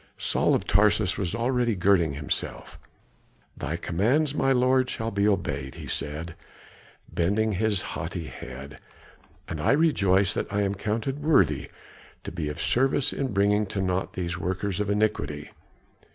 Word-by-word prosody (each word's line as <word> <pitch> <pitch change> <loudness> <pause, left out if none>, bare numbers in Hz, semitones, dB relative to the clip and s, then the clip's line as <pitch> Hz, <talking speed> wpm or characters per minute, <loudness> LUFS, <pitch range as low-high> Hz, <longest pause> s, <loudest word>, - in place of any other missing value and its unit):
Saul - - +2
of - - -1
Tarsus 105 0 +3
was 95 -2 -2
already 120 -1 +1
girding 90 -4 +3
himself. 70 0 -4 0.8
"Thy 80 - -3
commands, 125 - +1
my 135 -2 +2
lord, 130 0 +3
shall 115 -1 -3
be 100 +1 +2
obeyed," 70 -9 -1
he - - -8
said, 80 +3 -4 0.8
bending 105 +6 +1
his 105 0 0
haughty 80 +2 -4
head, 65 -1 -9 0.7
"and 80 -2 -4
I 75 - +3
rejoice 100 - +3
that - - -3
I 105 0 +1
am 100 0 0
counted 110 +7 -2
worthy 100 - +3 0.5
to - - -6
be 80 -3 -3
of 75 - -6
service 135 +2 +2
in 135 -3 -2
bringing 100 +1 +2
to 95 - -4
naught 95 0 -1
these 85 -1 -3
workers 95 +2 -2
of 105 -1 -1
iniquity. 100 -9 -1
100 Hz, 150 wpm, -26 LUFS, 85-115 Hz, 0.8 s, Tarsus